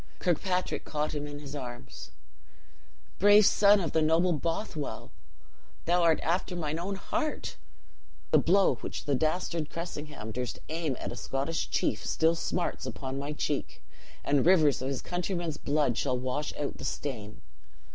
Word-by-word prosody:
Kirkpatrick 180 +1 0
caught 150 0 -2
him 150 -1 -3
in 145 0 -7
his 145 0 -8
arms. 120 -3 -7 1.1
"Brave 205 +1 +7
son 205 +1 +6
of 170 - -1
the 160 - +2
noble 165 +3 +3
Bothwell, 160 0 -3 0.7
thou 175 +1 +3
art 165 -2 +4
after 180 +2 0
mine 160 -2 -2
own 195 +3 -2
heart! 310 +10 -3 0.8
The - - +7
blow 195 +3 +4
which - - -6
the 145 - +1
dastard 160 +2 0
Cressingham 150 -9 -6
durst 125 +2 -3
aim 160 -5 -2
at - - -4
a - - -5
Scottish 140 +5 -2
chief, - - 0
still 160 +1 +2
smarts 170 +1 -2
upon 135 0 -4
my 140 +1 -3
cheek; - - -3 0.4
and 140 -1 +3
rivers 160 -7 +5
of 130 - -2
his 135 -2 -3
countrymen's 175 -3 -2
blood 145 -5 +1
shall 130 -3 +1
wash 130 +4 -2
out 145 - -3
the - - -7
stain. 115 -7 -4
155 Hz, 155 wpm, -29 LUFS, 140-175 Hz, 1.1 s, Brave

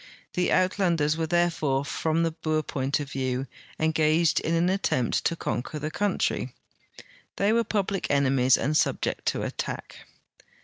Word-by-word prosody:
The 180 -1 +1
Uitlanders 175 -5 +2
were 160 0 -2
there 175 +1 +2
fore 140 -4 -1
from 160 +2 0
the 165 - +1
Boer 155 -1 -1
point 140 +1 -1
of 145 -1 -6
view 130 -1 -2 0.3
engaged 160 +1 +3
in 165 - -1
an 170 +1 +2
attempt 185 -10 0
to 170 - +1
con 140 - -2
quer 150 - -7
the 155 +2 -4
countiy; 205 +3 -1 0.8
they 200 +2 +2
were 230 0 +3
public 200 -2 -1
enemies 135 -2 +3
and 150 +2 -1
subject - - 0
to - - 0
attack. - - -5
160 Hz, 160 wpm, -26 LUFS, 140-175 Hz, 0.8 s, engaged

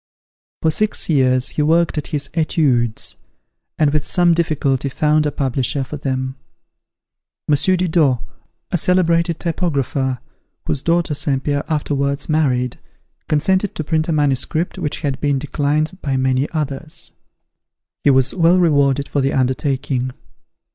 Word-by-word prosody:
For 160 - +3
six 215 0 0
years, 130 -3 +3
he - - -2
worked 165 +3 +2
at 150 - -3
his 145 -2 -2
"Etudes," 140 -8 0 0.6
and 150 -2 +2
with 150 -2 +1
some 175 -2 +3
difficulty 145 -5 0
found 150 +2 +2
a - - -1
publisher 135 0 -1
for 135 - -7
them. 130 -1 -3 1.1
M. 150 - +3
Didot, 160 -3 +2 0.5
a - - +2
celebrated 170 -1 +2
typographer, 140 -6 -1 0.5
whose 135 - -1
daughter 170 -1 +1
St. 140 -2 0
Pierre 145 -1 -1
afterwards 140 -2 -1
married, 130 -6 0 0.5
consented 185 +6 +1
to 155 - -2
print 155 +1 -1
a - - +2
manuscript 150 +3 0
which 150 - -3
had 140 -4 -2
been 145 -2 +1
declined 150 +4 -1
by 135 -2 -1
many 130 +1 +1
others. 155 0 -5 0.9
He - - +4
was 130 -1 +3
well 175 0 +4
rewarded 140 -5 +2
for 145 - -1
the 135 +1 0
undertaking. 130 0 -1
145 Hz, 135 wpm, -19 LUFS, 135-160 Hz, 1.1 s, He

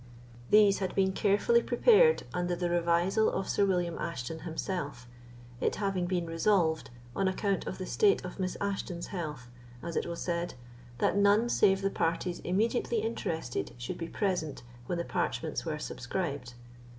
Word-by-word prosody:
These 205 -2 +6
had 190 -2 -3
been 190 -1 +3
carefully 210 +4 +3
prepared 470 - +5
under 175 0 -1
the 175 0 -1
revisal 175 +5 +2
of - - -2
Sir 200 - +2
William 175 -3 0
Ashton 160 -1 -4
himself, 160 -6 -4 0.5
it - - 0
having 195 -3 -1
been 175 -2 0
resolved, 165 -1 +1 0.3
on 195 - +1
account 195 +1 -1
of - - -4
the 185 - -5
state 400 - +2
of 180 - -8
Miss 185 -1 -2
Ashton's 195 -3 -3
health, 150 -8 -5 0.4
as 170 -1 -5
it - - 0
was 170 0 -5
said, 170 0 -2 0.4
that - - +1
none 205 +4 +4
save 195 -4 +3
the 195 - +1
parties 170 +2 -1
immediately 225 +5 0
interested 160 - -3
should 120 0 -5
be 165 - -3
present 170 - -2 0.2
when 175 - -1
the 170 - -2
parchments 170 -3 -2
were 155 -2 -2
subscribed. 140 -3 -4
180 Hz, 160 wpm, -30 LUFS, 165-200 Hz, 0.5 s, These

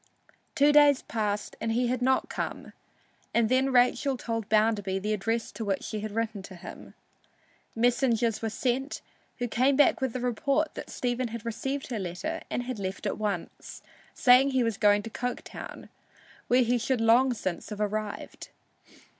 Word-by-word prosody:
Two 290 -1 +5
days 290 -2 +6
passed 210 -2 -2
and 225 - 0
he 245 +2 +1
had 250 +1 -1
not 260 +1 +2
come, - - -5 0.6
and 230 -2 +3
then 260 +1 +2
Rachel 255 +2 +3
told 225 -3 -4
Bounderby 210 -3 +2
the 210 +3 -1
address 225 +3 -2
to 225 - -6
which 195 -3 -1
she 215 - -4
had 215 +1 -4
written 225 -3 -2
him. 185 -2 -11 0.8
Messengers 235 -1 +2
were 225 - -1
sent, 260 +5 -2 0.3
who 245 - -2
came 255 +4 +2
back 290 -1 +4
with 260 -3 -1
the 255 - -3
report 275 +5 0
that - - -8
Stephen 245 0 -2
had 230 0 -7
received 270 +4 -3
her 230 - -2
letter 200 - -4
and 245 - -2
had 245 -3 -5
left 190 0 -5
at - - -2
once, 200 -5 -4 0.3
saying 255 +2 +6
he 260 -2 +2
was 230 -2 0
going 205 0 +4
to 225 - -7
Coketown, 250 +2 -6 0.6
where 250 +1 +4
he 240 +1 +1
should 255 +1 0
long 235 +4 +4
since 185 -5 -4
have 210 -1 -6
arrived. 210 0 -4
235 Hz, 170 wpm, -28 LUFS, 215-255 Hz, 0.8 s, days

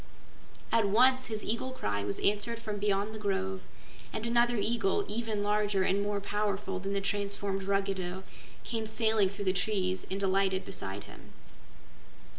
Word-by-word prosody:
At 230 -2 +4
once 255 +5 +5
his 215 -2 -3
eagle 235 +4 -1
cry 100 - -2
was 100 -1 -2
answered 210 +3 +1
from 215 -2 -4
beyond 205 +1 +1
the 215 - -6
grove, 190 -2 -1 0.5
and 220 - -3
another 240 +1 +3
eagle, 220 -2 +1
even 215 -1 -1
larger 205 -2 +2
and 195 +2 +2
more 205 0 0
powerful 200 -2 -1
than 195 +1 -3
the 200 - 0
transformed 200 0 -1
Ruggedo, 190 -2 -1 0.4
came 225 -2 -2
sailing 220 -2 +3
through 200 +1 -5
the 185 - +3
trees 190 -1 0
and 195 +1 -2
alighted 190 0 +2
beside 100 - -5
him. - - -14
200 Hz, 155 wpm, -31 LUFS, 195-220 Hz, 0.5 s, once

